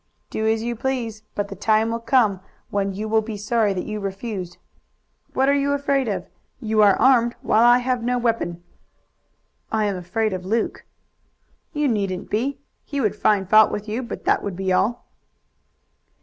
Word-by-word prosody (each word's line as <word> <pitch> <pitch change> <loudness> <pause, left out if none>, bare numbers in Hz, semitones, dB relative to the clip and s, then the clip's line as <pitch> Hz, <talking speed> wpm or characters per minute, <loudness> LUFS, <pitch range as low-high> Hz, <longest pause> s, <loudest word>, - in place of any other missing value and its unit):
"Do 220 - -1
as 220 0 +1
you 240 0 -2
please, 235 -3 -3
but 205 0 -2
the 195 - -7
time 220 +3 +2
will 230 - -2
come 230 -5 +2 0.3
when 200 -1 0
you 215 +2 -4
will 220 0 +3
be 215 -1 -6
sorry 215 0 +1
that 180 - -3
you 215 -1 -4
refused. 195 -2 -5 0.8
What 265 +1 +2
are 280 - +4
you 285 0 +1
afraid 280 -2 0
of? 205 - -2 0.3
You 220 -1 +1
are 200 -2 +6
armed, 240 -3 +4
while 215 - +3
I 240 0 +7
have 250 -1 -1
no 245 +1 0
weapon." 225 -8 -1 1.1
"I 220 -1 +1
am 200 -2 -1
afraid 190 +4 -1
of 185 -1 -4
Luke." 220 +5 -2 0.9
"You 295 -1 0
needn't 195 -6 -2
be. 255 +7 0 0.3
He 285 - -4
would 215 -6 +1
find 205 -3 +2
fault 215 +2 +6
with 210 +1 -4
you, 220 +4 -2
but 235 - -7
that - - +3
would 200 -3 -4
be 190 0 -1
all." 230 +6 0
220 Hz, 180 wpm, -22 LUFS, 200-240 Hz, 1.1 s, I